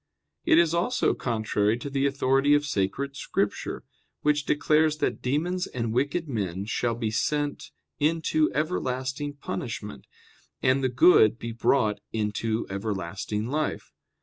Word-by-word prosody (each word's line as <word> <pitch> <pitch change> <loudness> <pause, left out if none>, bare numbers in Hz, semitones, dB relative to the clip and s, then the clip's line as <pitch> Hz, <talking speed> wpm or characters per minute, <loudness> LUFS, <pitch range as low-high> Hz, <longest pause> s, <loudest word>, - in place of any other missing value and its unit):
It - - +5
is 170 -1 +4
also 180 +9 +1
contrary 110 -2 0
to 125 - -7
the 140 0 +1
authority 135 +1 +3
of 145 0 +1
Sacred 135 +4 -2
Scripture, 100 -6 -2 0.4
which 150 -1 +1
declares 155 +1 +3
that - - -1
demons 170 +8 -1
and 115 -3 -3
wicked 140 +7 0
men 100 -7 -3
shall 115 +1 -1
be 115 -2 -2
sent 145 +5 -1 0.3
"into 155 0 +2
everlasting 140 -2 -2
punishment," 105 - -6 0.6
and 130 +1 +3
the 130 - +2
good 120 - +5 0.2
brought 110 -7 +2
"into 110 +1 -1
everlasting 100 +1 -3
life." 150 +3 -2
130 Hz, 125 wpm, -26 LUFS, 110-150 Hz, 0.6 s, It